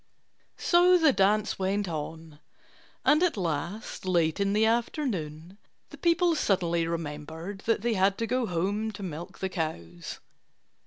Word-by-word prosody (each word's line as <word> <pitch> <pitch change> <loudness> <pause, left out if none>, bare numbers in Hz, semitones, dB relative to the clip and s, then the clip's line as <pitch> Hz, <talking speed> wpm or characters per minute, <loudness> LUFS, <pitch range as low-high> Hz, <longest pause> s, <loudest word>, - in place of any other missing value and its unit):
So 360 +1 +5
the 315 -5 +4
dance 210 +1 +2
went 195 +1 0
on. 160 -1 -6 0.7
And 300 +2 +5
at 360 -9 +2
last, 175 +4 -3
late 170 -3 +1
in 200 0 +1
the 215 +1 +3
afternoon, 200 - -2 0.3
the - - -10
people 340 0 +3
suddenly 170 - +1
remembered 165 +3 -5
that 225 -2 +1
they 240 -1 +1
had 195 0 +2
to 230 - -1
go 250 +1 0
home 200 +5 -1
to 200 - -8
milk 175 +2 -7
the 190 - -2
cows. 85 - -5
195 Hz, 145 wpm, -28 LUFS, 165-220 Hz, 0.7 s, So